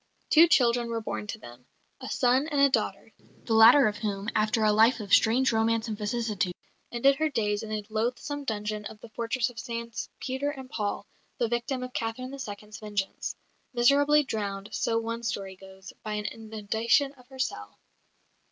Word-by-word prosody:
Two 325 +2 +8
children 240 -5 +3
were 230 0 -1
born 215 -1 -5
to 220 - -5
them, 125 - -14 0.3
a 260 - -7
son 260 +3 +2
and 295 -3 -1
a 280 0 +6
daughter, - - -1 0.3
the 225 - 0
latter 230 +5 +8
of 210 -1 -2
whom, 205 -2 -3
after 215 +1 +1
a 215 - +5
life 225 +3 +5
of 205 -2 -4
strange 250 +4 +5
romance 225 +1 +1
and 220 - -3
vicissitude, 210 -4 -2 0.4
ended 270 +3 +3
her 315 0 +1
days 210 -6 0
in 220 - -7
a 215 -1 -2
loathsome 245 +7 -2
dungeon 210 -3 -3
of 210 - -8
the 235 - -11
fortress 235 +2 -1
of 240 - -10
Saints 235 -2 -5
Peter 265 +3 -2
and 265 -3 -8
Paul, 205 -1 -3 0.3
the 235 - +1
victim 240 +2 -2
of 250 0 -7
Catherine 235 +3 -3
II.'s 215 -5 -8
vengeance 205 -2 -3 0.4
miserably 285 +5 +5
drowned, 205 -4 -4
so 230 - 0
one 230 +1 -3
story 195 -4 -4
goes, 190 0 -13
by 215 - -4
an 210 0 -3
inundation 220 +5 0
of 250 -3 -20
her 265 0 -13
cell. 100 - -4
225 Hz, 180 wpm, -28 LUFS, 210-255 Hz, 0.4 s, Two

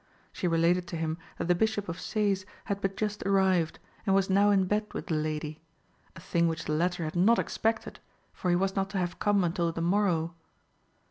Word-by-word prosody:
She 180 - -2
related 170 +2 +2
to 170 - -5
him 160 +1 -2 0.2
that - - -3
the 180 - +5
Bishop 210 +2 0
of 170 +1 -5
Sees 200 -3 0 0.2
had 200 -2 -2
but 195 0 -2
just 210 -1 -2
arrived, 190 -4 +2 0.3
and 195 -3 +2
was 195 -1 +2
now 200 +2 +5
in 195 -2 +4
bed 210 +3 -1
with - - -4
the - - -2
lady, 155 0 -2 0.5
a - - -9
thing 170 -1 +1
which 165 0 -3
the 155 - -1
latter 175 +2 0
had 155 +1 -4
not 210 +7 +5
expected, 225 0 -1 0.3
for 180 - -2
he 175 - +4
was 190 +2 0
not 195 -1 0
to 200 - -3
have 175 -1 -2
come 205 -2 +3
until 170 -1 0
the 165 - -6
morrow. 170 -2 +1
180 Hz, 210 wpm, -29 LUFS, 165-200 Hz, 0.5 s, the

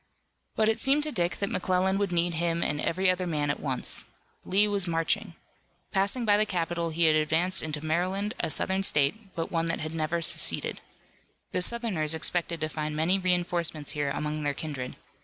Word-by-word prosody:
But 215 - +2
it 220 - +1
seemed 285 +2 +3
to 305 - 0
Dick 175 -7 0
that 200 - -2
McClellan 185 +1 +1
would 200 -2 0
need 175 0 +1
him 170 +1 0
and 150 0 -1
every 185 +3 0
other 180 0 -2
man 150 -3 0
at - - -4
once. 130 -3 -3 0.4
Lee 200 +3 +3
was 200 -3 0
marching. 170 +3 -1 0.6
Passing 200 +5 +3
by 205 -1 +5
the 215 - +3
capital 170 -3 -1
he 165 +1 0
had 155 -1 +5
advanced 160 +4 +2
into 155 -1 -4
Maryland, 185 +6 0
a - - 0
Southern 190 +4 0
state, 190 +5 +1
but 165 - -3
one 165 -1 0
that 165 - -1
had 155 +1 -4
never 165 +1 -1
seceded. - - 0 0.7
The - - 0
Southerners 180 -8 +1
expected 170 0 -1
to 155 - 0
find 155 0 -4
many 170 +5 +2
reinforcements 175 -4 +1
here 145 -1 -1
among 150 +2 -3
their 145 -1 -1
kindred. 140 -4 -5
170 Hz, 190 wpm, -28 LUFS, 155-190 Hz, 0.7 s, by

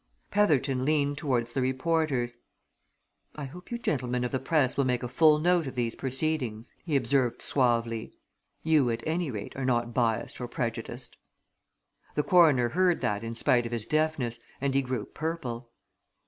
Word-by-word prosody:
Petherton 145 -10 +2
leaned 145 0 +1
towards 120 -5 -1
the 135 - 0
reporters. 130 -2 0 1.0
"I 150 - -5
hope 180 +7 -11
you 235 - -2
gentlemen 125 - -1
of 125 - -2
the 130 - 0
press 135 -1 +1
will 140 - +2
make 125 -1 0
a - - -1
full 150 +4 +5
note 170 0 +2
of 130 - -6
these 120 -2 -1
proceedings," 130 -4 -2
he 155 -4 -1
observed 130 -1 +1
suavely. 115 -4 +1 0.5
"You 155 -6 +3
at 115 0 -2
any 165 0 -1
rate 105 -4 -6
are 135 - -4
not 120 -2 0
biassed 115 0 0
or 125 - -3
prejudiced." 120 +1 -4 1.0
The 150 - +2
coroner 150 -10 +5
heard 180 +2 +2
that 105 +1 -1
in 115 0 -5
spite 120 +1 +2
of - - -9
his 115 -3 -3
deafness, 155 -6 0 0.2
and 140 0 0
he 135 - +3
grew 125 -5 -3
purple. 135 -7 -4
130 Hz, 165 wpm, -28 LUFS, 120-155 Hz, 1.0 s, full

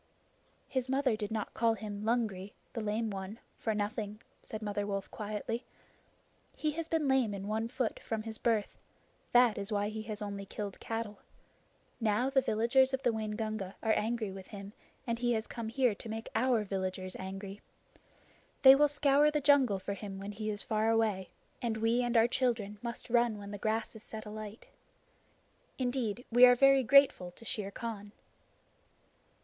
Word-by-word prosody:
"His 260 -1 -2
mother 265 -3 +2
did 210 -1 -4
not 220 -2 -3
call 230 -1 +2
him 205 -2 -6
Lungri 215 -4 -1 0.2
[the 230 - -3
Lame 215 +1 -1
One] 195 +2 -6 0.2
for 220 -2 -1
nothing," 210 0 -3 0.2
said 220 0 -7
Mother 205 -1 -2
Wolf 195 -1 -3
quietly. 215 +3 -4 0.9
"He 305 - 0
has 325 +2 -4
been 320 -3 0
lame 260 -6 +2
in 195 0 -6
one 220 +2 -1
foot 250 -1 -2
from 220 -1 -3
his 220 -1 -6
birth. 220 -3 +1 0.6
That 245 -4 +5
is 200 +2 -3
why 205 0 0
he 215 0 -5
has 215 -1 -4
only 200 -2 -5
killed 205 -1 -5
cattle. 225 -2 -4 0.8
Now 225 +3 +1
the 265 -1 +4
villagers 260 +3 +3
of 265 - -10
the 240 - +3
Waingunga 215 -2 -3
are 220 -1 +3
angry 220 -2 -1
with 190 -1 -9
him, 200 -1 -9 0.3
and 235 -2 -2
he 240 0 +2
has 220 0 -1
come 230 -2 -5
here 250 -1 +2
to 220 - -9
make 225 +1 -5
our 240 -3 +2
villagers 185 -1 -3
angry. 195 +1 -7 1.0
They 265 0 +11
will 295 +2 +5
scour 290 0 +4
the 300 0 +1
jungle 275 -7 +4
for 190 +1 -4
him 200 0 -7
when 200 +1 -6
he 215 +1 -4
is 205 -1 -2
far 220 0 +1
away, 215 -5 +1 0.3
and 230 -2 -1
we 225 +2 +2
and 240 -1 +1
our 225 +1 +6
children 230 -5 0
must 235 0 -6
run 235 -2 +3
when 200 0 -8
the 205 - -6
grass 220 +2 -1
is 220 - -10
set 220 -1 -8
alight. 215 +1 -8 1.1
Indeed, 245 -3 -1
we 245 +2 +6
are 245 - +7
very 275 +1 +6
grateful 260 -8 +5
to 230 - -14
Shere 210 -3 -2
Khan!" 205 -1 -6
220 Hz, 175 wpm, -32 LUFS, 205-240 Hz, 1.1 s, They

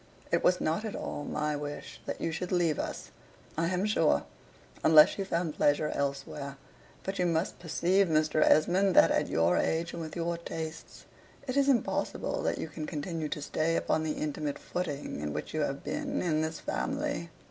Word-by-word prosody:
It - - +2
was 180 - +4
not 165 +7 0
at 220 - -4
all 145 - -4
my 150 0 -1
wish 145 0 -6
that - - -3
you 165 - -1
should 175 +3 -4
leave 170 -4 +2
us, - - -5 0.4
I 165 +1 +1
am 185 +2 0
sure, 210 - +3 0.6
unless 155 +3 +7
you 195 - -1
found 170 -4 -1
pleasure 150 +1 +2
elsewhere. 140 0 -3 0.5
But 195 0 -4
you 180 - +3
must 165 +1 -1
perceive, 180 +3 +2
Mr. 155 -1 +2
Esmond, 185 +5 +4
that - - +7
at - - +2
your 85 +2 +2
age, 165 +1 0
and 170 - -5
with 160 -1 -6
your 170 0 -2
tastes, 160 -1 -7 0.4
it 255 - -2
is 280 0 +4
impossible 275 - 0
that - - 0
you - - -3
can 155 0 -6
continue 160 0 -3
to 150 - -4
stay 155 +3 0
upon 155 - +1
the 155 -1 -1
intimate 150 -1 -3
footing 145 - -4
in 75 0 -3
which 75 - -5
you 155 - 0
have 140 -1 -2
been 285 -1 -2
in 155 -3 +1
this 160 +1 -3
family. 280 - -2
160 Hz, 190 wpm, -30 LUFS, 150-180 Hz, 0.6 s, unless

